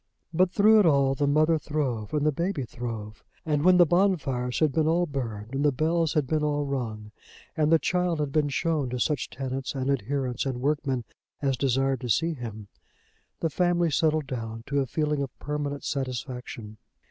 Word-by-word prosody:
But, 180 +2 +3
through 215 +2 +6
it 205 - +5
all, 140 -3 +4
the 145 +1 0
mother 155 +3 +3
throve 130 -9 -2
and 150 -1 0
the 155 - +4
baby 170 0 -2
throve; 115 -3 -6 0.2
and 150 -2 +1
when 180 +1 +6
the 175 - +7
bonfires 150 -9 +1
had 155 -3 +3
been 155 +1 +1
all 170 +2 +2
burned 120 -6 -5
and 135 +1 0
the 145 - +4
bells 160 +3 +1
had 150 -3 +2
been 155 +3 0
all 145 -1 0
rung, 110 -6 -4 0.4
and 155 -1 +2
the 165 - +7
child 180 -1 0
had 145 -2 -1
been 150 0 +1
shown 150 -2 0
to 125 0 -3
such 150 +3 0
tenants 135 0 -4
and 135 +1 0
adherents 130 0 -1
and 130 -2 -3
workmen 135 -2 0 0.4
as 135 -2 +1
desired 135 +1 +1
to 125 - -5
see 165 - +2
him, 110 -6 -7 0.7
the 165 - 0
family 175 0 +2
settled 155 +1 +2
down 115 -4 -5
to 140 0 0
a 135 - 0
feeling 150 +3 -1
of 135 -2 -5
permanent 145 -1 -4
satisfaction. 125 -4 -5
140 Hz, 190 wpm, -27 LUFS, 125-155 Hz, 0.7 s, the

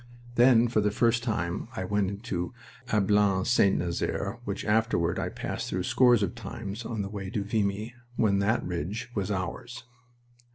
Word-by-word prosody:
Then 120 -1 +6
for 110 -2 +1
the 105 - +2
first 115 +1 +2
time 90 -7 -2
I 95 - -2
went 100 0 0
into 100 0 -4 0.4
Ablain 100 -2 +3
St. 105 -5 +4
Nazaire, 85 -1 -2
which - - -4
afterward 105 -6 +1
I - - -1
passed - - -4
through 90 0 -1
scores 120 0 +4
of 100 - -1
times 115 -2 -6
on 110 -3 -3
the - - -4
way 100 -2 -5
to 105 -2 -2
Vimy 105 +2 -1 0.2
when 100 -4 +2
that 105 +4 +1
ridge 90 +7 -4
was 100 -2 -2
ours. 105 +5 -4
105 Hz, 165 wpm, -28 LUFS, 95-115 Hz, 0.4 s, Then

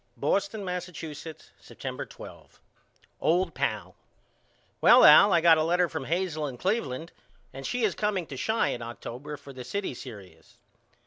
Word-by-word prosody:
Boston, 200 - -1
Massachusetts, 165 -4 -7
September - - -7
12. - - -13 0.6
OLD 180 +3 +1
PAL: - - -3 0.9
Well - - +7
Al 200 - +9
I 170 - +4
got 165 -1 +6
a - - +2
letter 175 +2 +2
from 135 - -5
Hazel 165 -2 -1
in 130 -3 -7
Cleveland 165 - -2 0.4
and 135 +1 -6
she 245 -1 -2
is 210 -4 +2
comeing 205 -3 -1
to 140 - -6
Chi 220 - 0
in 120 - -4
October 120 +5 -7
for 140 -1 -13
the 130 -1 -8
city 200 +8 -3
serious. 100 -10 -12
165 Hz, 150 wpm, -27 LUFS, 135-190 Hz, 0.9 s, Al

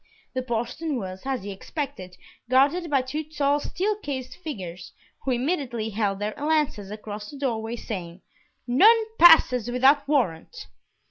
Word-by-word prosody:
The 255 - -1
postern 255 +5 -3
was, 190 -3 -6
as 265 -6 -2
he 200 - -5
expected, 195 - -6 0.3
guarded 290 +7 +3
by 275 -3 +2
two 295 +5 -4
tall 290 -1 0
steel 400 +8 -1
cased 270 -10 -5
figures, 185 - -7 0.3
who - - -2
immediately 245 -4 -1
held 200 -2 -1
their 210 +1 -3
lances 295 -9 0
across 210 0 -7
the 285 - -10
door 250 -5 -1
way, 225 +1 -4
saying, 185 -6 -7 0.5
"None 435 - +6
passes 255 -9 +7
without 270 +4 +4
warrant." 270 - -1
255 Hz, 145 wpm, -25 LUFS, 210-295 Hz, 0.5 s, passes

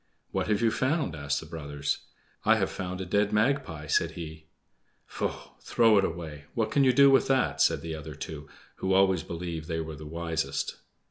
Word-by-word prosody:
"What - - -1
have 105 +1 +1
you 115 - +4
found?" 130 - 0
asked 70 -1 -1
the - - -9
brothers. 75 -3 -3 0.4
"I - - +5
have - - 0
found 90 -1 -4
a - - -3
dead 100 +3 +1
magpie," 105 - +1
said 75 - +1
he. 80 -1 -8 0.6
"Faugh! - - -4
throw 115 -3 +4
it - - +2
away; 80 -4 -4
what 110 -2 0
can 140 +4 +4
you 130 - +6
do 140 +2 +7
with 135 - +4
that?" 135 -1 +2
said - - +3
the 80 -1 -4
other 80 -2 -7
two, 75 -1 -7 0.3
who 95 - 0
always 95 -3 +4
believed 85 -1 -5
they 80 -2 -2
were 80 -1 -5
the 75 +1 -9
wisest. 80 -3 -2
85 Hz, 195 wpm, -28 LUFS, 80-110 Hz, 0.6 s, do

